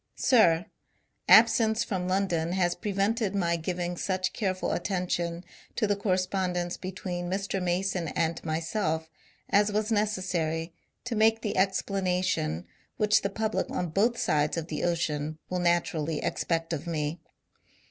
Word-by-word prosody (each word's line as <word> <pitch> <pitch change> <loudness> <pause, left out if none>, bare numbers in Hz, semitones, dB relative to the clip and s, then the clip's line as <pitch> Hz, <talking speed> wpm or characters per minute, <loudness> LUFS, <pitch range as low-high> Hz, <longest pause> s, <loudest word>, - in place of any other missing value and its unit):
Sib, 175 -9 +4 0.3
— - - -20
Absence 220 -1 +2
from 185 -4 -3
London 180 -3 0
has 175 -2 +2
prevented 205 0 -1
my 170 -3 +1
giving 175 +1 -3
such 185 0 -1
careful 185 -4 -1
attention 175 -2 -2 0.3
to 225 - +1
the 205 -1 +1
correspondence 185 -2 -1
between 180 -1 -5
Mr. 195 0 -2
Mason 180 -1 0
and 165 +1 -1
myself 160 0 -2 0.4
as 205 +1 +4
was 215 +2 -1
necessary 185 -6 -1 0.3
to 245 -1 -3
make 220 +1 +3
the 210 - -2
explanation 185 - 0 0.3
which 210 0 +3
the 200 - -1
public 220 +2 -1
on 175 - -2
both 225 +8 +2
sides 150 +1 +1
of 165 0 -4
the 150 - -3
ocean 155 -3 -1
will 180 - 0
naturaUy 165 -3 +1
ex - - -2
pect 165 0 -1
of 160 +1 -4
me. 155 0 -2
180 Hz, 140 wpm, -28 LUFS, 165-200 Hz, 0.4 s, Sib